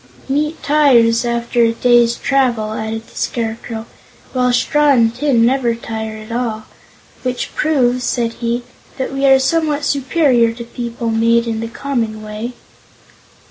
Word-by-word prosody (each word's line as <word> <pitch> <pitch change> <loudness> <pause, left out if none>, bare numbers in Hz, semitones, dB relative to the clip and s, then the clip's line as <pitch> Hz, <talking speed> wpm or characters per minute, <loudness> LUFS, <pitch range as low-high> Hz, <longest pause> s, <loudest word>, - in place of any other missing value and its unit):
"Meat 300 +4 -1
tires, 245 -6 +4
after 235 0 0
a 230 0 +3
day's 240 0 +3
travel," 240 -6 0
added 220 +1 -4
the - - -20
Scarecrow, 225 -1 -4 0.5
"while 250 -1 +2
straw 295 +4 +2
and 230 -4 +4
tin 245 -4 +2
never 245 -2 +1
tire 220 -1 -5
at 215 +1 -10
all. 230 -2 -2 0.6
Which 250 -1 -3
proves," 255 -5 +1
said 235 -1 -1
he, 235 +1 -1 0.3
"that 265 0 -3
we 275 0 +1
are 270 0 +7
somewhat 300 +1 0
superior 270 -5 +2
to 235 +1 -8
people 235 0 -4
made 230 +1 +2
in 225 -1 -2
the 230 - -3
common 230 -4 -3
way." 215 +3 -6
235 Hz, 145 wpm, -17 LUFS, 230-265 Hz, 0.6 s, are